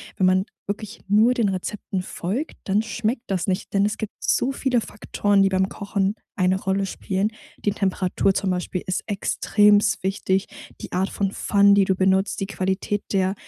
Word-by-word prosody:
wenn 190 - +2
man 185 +1 +3 0.2
wirklich 210 +2 -5
nur 220 +4 +5
den 230 -5 +1
Rezepten 190 0 -3
folgt, 210 - -4
dann 205 +3 +1
schmeckt 225 +2 -2
das 190 0 -1
nicht, 190 +2 -2
denn 200 0 +3
es 210 - -3
gibt 220 - -5
so 265 - +1
viele 255 -3 0
Faktoren, 205 -1 0
die 195 - +4
beim 190 0 +1
Kochen 200 0 -1 0.2
eine 185 -1 +1
Rolle 195 0 0
spielen. 195 +2 -1 0.4
Die 205 - +3
Temperatur 195 -1 +1
zum 195 -2 0
Beispiel 180 0 -3
ist 185 - -1
extremst 205 0 +3
wichtig. 190 0 0 0.3
Die - - -8
Art 185 +2 +1
von 195 -1 -1
Pfannen, 200 -1 +4
die 200 - +5
du 190 - +1
benutzt, 190 +1 +2
die 195 - -1
Qualität 190 +1 -2
der 190 -1 +2
195 Hz, 180 wpm, -23 LUFS, 190-210 Hz, 0.4 s, nur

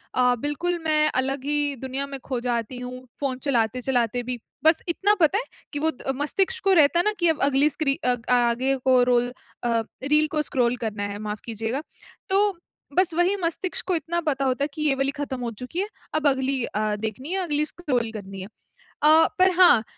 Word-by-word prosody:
अ, 250 -1 +4
बिल्कुल 335 +6 -1
मैं 305 -1 +3
अलग 270 0 -3
ही 290 -1 0
दुनिया 265 +1 -3
में 275 -1 -6
खो 255 -3 -2
जाती 240 0 -2
हूँ, 250 +1 -8
फ़ोन 270 -3 -1
चलाते-चलाते 245 -1 0
भी। 250 0 -2 0.3
बस 320 +1 +5
इतना 395 +5 +3
पता 345 +4 +4
है 480 - -1 0.3
कि 290 - -2
वो 320 +2 +2
द 270 -1 -4
मस्तिष्क 390 - 0
को 390 0 +4
रहता 325 0 +5
है 350 - +2
ना, 425 - +4
कि 345 - +3
अब 320 - 0
अगली 280 +1 +3
स्क्री 285 -1 0
अ, 250 - +3 0.2
आगे 245 +2 +2
को 255 -1 +5
रोल 245 0 +2 0.3
अ, 230 -1 +1 0.2
रील 300 +2 +4
को 305 - +1
स्क्रॉल 250 -4 +1
करना 210 -2 -3
है, 205 0 -4
माफ़ 210 0 -5
कीजिएगा। 225 +4 -3 0.5
तो, 395 0 +3 0.4
बस 370 -2 +3
वही 350 +4 +2
मस्तिष्क 335 +1 -2
को 365 - +2
इतना 335 +2 -1
पता 275 -3 0
होता 260 +1 0
है - - +1
कि 305 - -6
ये 295 -3 +4
वाली 270 +1 +1
खत्म 280 -2 -5
हो 240 - -2
चुकी 250 +8 -5
है। 400 - 0 0.3
अब 310 -1 +2
अगली 265 -1 +1
अ, 215 0 -1
देखनी 220 - -5
है, 385 - 0
अगली 300 -2 +1
स्क्रॉल 255 -9 -1
करनी 195 -3 -8
है। 190 - -7 0.6
अ, 315 +2 +7
पर 370 0 +5
हाँ, 345 -12 +7
275 Hz, 205 wpm, -24 LUFS, 245-315 Hz, 0.6 s, अ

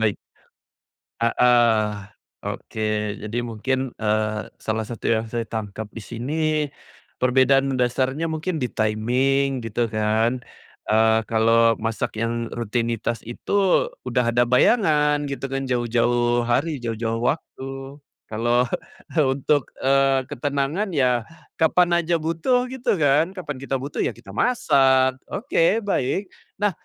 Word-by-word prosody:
Baik. 105 -3 +2 1.1
Heeh, 115 -2 +3 0.5
oke. 110 - -5 0.4
Jadi 105 +2 -4
mungkin, 130 +3 -2
eee, 110 0 0 0.2
salah 110 0 -2
satu 115 - -8
yang 110 0 +1
saya 115 +1 -2
tangkap 110 -1 -5
di - - -8
sini 125 +8 -4 0.8
perbedaan 130 +2 +4
mendasarnya 130 +4 0
mungkin 160 +2 -2
di 125 - -1
timing 130 +5 +1
gitu 115 +1 -1
kan, 110 +3 +1 0.5
eee, 110 +1 +4
kalau 115 0 +4
masak 115 -1 -2
yang 115 0 -1
rutinitas 115 0 -2
itu 190 +10 +1 0.2
udah 120 -1 +1
ada 120 +1 +4
bayangan 150 - +3
gitu 135 0 -4
kan 135 0 -2
jauh-jauh 120 0 +1
hari, 140 +5 0
jauh-jauh 115 -1 -2
waktu. 135 0 -4 0.3
Kalau 120 +3 +2 0.6
untuk, 135 +1 +1 0.2
eee, 135 0 +3
ketenangan 145 - -1
yah 125 -4 +2 0.3
kapan 175 +1 +4
aja 170 0 0
butuh 165 +11 +1
gitu 260 -5 0
kan 155 +4 +2
kapan 150 -7 -5
kita 135 0 -3
butuh 135 +2 -5
ya 115 - 0
kita 95 - -13
masak, 130 - +3
oke 215 -2 +1
baik. 190 0 -1 0.2
Nah, 205 0 +1
125 Hz, 120 wpm, -23 LUFS, 115-145 Hz, 1.1 s, perbedaan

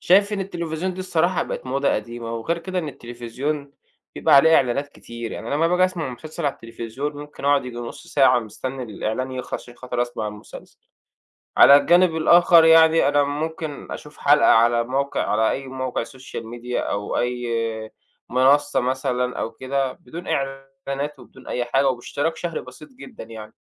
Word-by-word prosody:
شايف 200 +3 +4
إن 205 - -1
التليفزيون 175 -1 -3
دي 185 - -6
الصراحة 180 -1 +1
بقت - - -6
موضة 140 +2 0
قديمة. 115 +1 -5
وغير 160 +9 -2
كده 185 +2 -4
إن 160 -4 -3
التليفزيون 130 +4 -5 0.4
بيبقى - - +3
عليه 160 +4 +7
إعلانات 135 +3 +1
كتير، 120 -4 -8
يعني 115 - -6
أنا - - -1
لمّا 160 +3 +2
باجي 180 +1 +3
أسمع 185 -5 -2
مسلسل 155 +5 -5
على 140 - 0
التليفزيون 115 +5 -6
ممكن 145 -1 -10
أقعد 140 -1 +3
ييجي 125 -2 -7
نص 120 -1 -8
ساعة 135 -3 +4
مستني 125 +4 -6
الإعلان 115 +3 -3
يخلص 125 -1 -6
عشان 120 - -14
خاطر 125 -1 -2
أسمع 120 -3 -4
المسلسل. 105 0 -12 0.8
على 140 - +9
الجانب 175 +3 +4
الآخر 170 +1 +6
يعني 160 -2 +6
أنا 145 0 +3
ممكن 155 +1 -4
أشوف 150 0 -9
حلقة 145 -4 +4
على 120 +1 +4
موقع، 135 +3 -1
على 110 +1 +2
أي 135 - -3
موقع 130 -2 -3
social 130 +1 -9
media 120 +2 -6
أو 100 0 -2
أي 125 0 -2 0.4
آآ 110 - -12 0.4
منصة 140 +4 +3
مثلًا 125 -1 -1
أو 115 - -2
كده 130 +2 -2
بدون 170 +2 -10
إعـلانات 135 +1 -4
وبدون - - -16
أي 125 - -1
حاجة 135 +3 +2
وباشتراك 145 +5 -2
شهري 170 0 -4
بسيط 130 +5 -13
جدًا 255 - -11
يعني. 110 -1 -10
135 Hz, 170 wpm, -22 LUFS, 120-160 Hz, 0.8 s, على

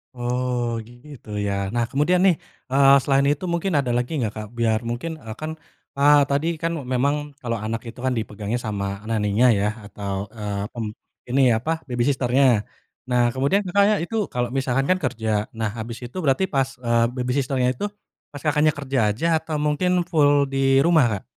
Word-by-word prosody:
Oh, 120 -1 -1
gitu 120 0 -14 0.2
ya. 100 -1 -1
Nah, 120 - +2
kemudian 150 +6 +2
nih, 190 -3 +5 0.4
eee, 140 0 +6
selain 140 0 +3
itu 145 +5 0
mungkin 170 +2 -1
ada 135 -4 +1
lagi 125 +3 -2
gak, 110 -2 -2
Kak? 110 -1 -6
Biar, 110 -2 +2
mungkin, 155 +7 -4
eee, 110 -4 -8
kan, 155 +4 -5 0.5
a 145 +1 +6
tadi 140 +3 +1
kan, 165 0 0 0.2
memang, 145 +3 0
kalau 115 -2 -2
anak 110 +1 -3
itu 120 - -12
kan 130 - +1
dipegangnya 110 +1 -3
sama 100 -2 -4
nanny-nya 110 +1 +2
ya, 100 -2 +1 0.2
atau, 100 -1 -5 0.2
eee, 105 -3 -4
mmm, 110 -3 -4 0.4
ini 135 +3 +2 0.2
apa, 160 +6 -3
baby 120 -1 -1
sister-nya. 130 -4 +3 0.5
Nah, 125 0 +3
kemudian 140 +10 +1
Kakaknya 200 +3 +4
itu 225 +6 -5 0.2
kalo 125 -1 -1
misalkan, 135 0 0
kan 185 - +3
kerja. 115 -4 -2 0.3
Nah, 110 - 0
habis 115 +1 -6
itu 120 +8 -9
berarti 140 +5 +2
pas, 135 -4 0
eee, 115 -1 +2
baby 125 0 -2
sister-nya 130 -2 +1
itu, 165 - -3 0.5
pas 145 - -8
Kakaknya 150 0 +3
kerja 135 -2 -1
aja, 110 +10 -4
atau 155 0 -5
mungkin 150 +5 +1 0.2
full 145 -4 +3
di 135 0 +2
rumah, 165 -5 +5
Kak? - - -24
130 Hz, 180 wpm, -23 LUFS, 115-145 Hz, 0.5 s, eee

